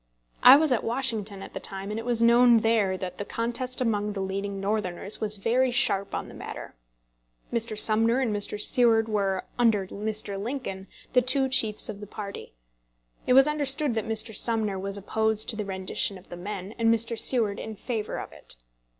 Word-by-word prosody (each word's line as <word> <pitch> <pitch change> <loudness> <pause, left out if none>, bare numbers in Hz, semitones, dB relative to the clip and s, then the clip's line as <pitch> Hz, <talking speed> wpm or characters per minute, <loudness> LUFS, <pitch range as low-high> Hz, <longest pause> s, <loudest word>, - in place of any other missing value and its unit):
I 255 - +9
was 305 0 +2
at 245 - 0
Washington 225 -5 -3
at - - -12
the - - -6
time, 195 +1 -6
and 215 - -4
it 225 - -9
was 235 -1 0
known 235 0 +4
there 215 -4 0
that 185 -1 -8
the - - -3
contest 240 +4 -4
among 210 -3 -2
the 200 - -6
leading 195 +1 -5
Northerners 195 -1 -4
was 215 -1 0
very 245 +6 0
sharp 200 -5 -1
on - - -5
the - - -13
matter. - - -9 0.8
Mr. 225 -2 -2
Sumner 225 +3 +9
and 235 -6 -1
Mr. 205 0 -1
Seward 225 0 +2
were, 195 -3 -2
under 220 -5 +2
Mr. 205 0 -5
Lincoln, 210 -5 -6 0.3
the 250 - +4
two 265 +2 +2
chiefs 220 -5 +2
of 210 -2 -8
the 205 - -10
party. 200 - -9 0.7
It 250 - +3
was 270 +2 +6
understood 295 -2 +2
that 220 -2 -4
Mr. 220 0 -2
Sumner 215 -4 +2
was 195 +1 -2
opposed 220 +2 -1
to - - -8
the 210 -1 -5
rendition 190 +1 -2
of 185 - -19
the - - -8
men, 195 +2 -8
and 230 0 +2
Mr. 230 +1 0
Seward 220 -3 +2
in 220 - -8
favour 220 0 -5
of - - -9
it. - - -10
220 Hz, 195 wpm, -25 LUFS, 200-235 Hz, 0.8 s, I